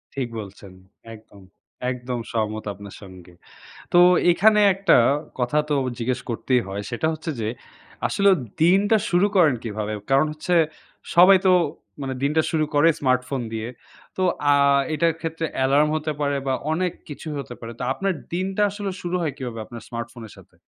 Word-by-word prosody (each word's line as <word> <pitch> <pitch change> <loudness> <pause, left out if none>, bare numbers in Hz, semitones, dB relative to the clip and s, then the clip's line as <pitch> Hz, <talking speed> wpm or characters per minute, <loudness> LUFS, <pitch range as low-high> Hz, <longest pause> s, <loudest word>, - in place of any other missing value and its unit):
ঠিক 135 -3 -2
বলছেন। 100 -1 -10 0.4
একদম 110 -2 -15 0.5
একদম 125 -1 -4
সহমত 110 -1 -2
আপনার 100 +1 -11
সঙ্গে। 90 -3 -13 0.6
তো 175 - +7 0.3
এখানে 210 +5 +4
একটা 195 +1 +4 0.4
কথা 125 +4 0
তো 150 - +2 0.2
জিজ্ঞেস 125 +1 -1
করতেই 125 +2 +1
হয়, 100 +1 -4
সেটা 120 +6 -1
হচ্ছে 160 +1 -5
যে 110 - -1 0.6
আসলে 200 0 +3 0.3
দিনটা 195 +6 +4
শুরু 180 +3 +3
করেন 160 -8 +5
কীভাবে? 110 -1 -4 0.2
কারণ 135 +2 +5
হচ্ছে 165 +4 -1 0.6
সবাই 185 +3 +8
তো - - +6 0.5
মানে 135 -1 -3
দিনটা 150 +3 +2
শুরু 155 -2 +1
করে 145 +3 +5
স্মার্টফোন 130 0 0
দিয়ে। 110 +1 -4 0.5
তো 185 - 0 0.3
আ - - +5 0.4
এটার 165 +2 +2
ক্ষেত্রে 165 0 -3
অ্যালার্ম 140 +3 +3
হতে 155 0 -2
পারে 145 -1 0
বা, 135 - +1 0.2
অনেক 180 +2 0 0.2
কিছুই 150 +1 -6
হতে 130 -3 -7
পারে। 115 0 -8
তো - - -3
আপনার 195 +5 -1 0.2
দিনটা 190 +3 -1
আসলে 200 -1 -4
শুরু 175 +1 -3
হয় 155 -4 -2
কিভাবে 120 -3 -6
আপনার 120 0 -10
স্মার্টফোনের 115 -2 -7
সাথে? - - -18
140 Hz, 160 wpm, -23 LUFS, 115-170 Hz, 0.6 s, সবাই